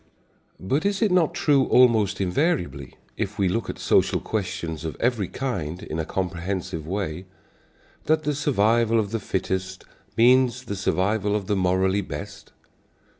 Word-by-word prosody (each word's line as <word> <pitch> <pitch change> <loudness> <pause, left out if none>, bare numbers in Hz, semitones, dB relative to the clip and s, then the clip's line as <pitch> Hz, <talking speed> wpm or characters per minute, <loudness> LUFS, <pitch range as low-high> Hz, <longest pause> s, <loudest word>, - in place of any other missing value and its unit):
But 135 - -1
is 200 +1 0
it 210 - +2
not 180 -4 +2
true 140 -3 +3
almost 110 -5 +4
invariably, 90 - -1 0.2
if - - -3
we 95 - +2
look 115 +6 -1
at - - -5
social - - +2
questions 85 -7 -4
of 80 - -5
every 115 -6 0
kind 95 - -4
in 80 -6 -5
a 80 - -1
comprehensive 90 -3 -3
way, 95 -2 -3 0.8
that 155 0 +2
the 150 - 0
survival 115 -4 +2
of 105 -2 -2
the 115 - -1
fittest 95 -1 -3 0.3
means 125 +1 +4
the 100 -5 -5
survival 100 +2 0
of 105 -2 -2
the 100 - 0
morally 95 +1 +1
best? 100 +4 -8
100 Hz, 150 wpm, -24 LUFS, 90-125 Hz, 0.8 s, almost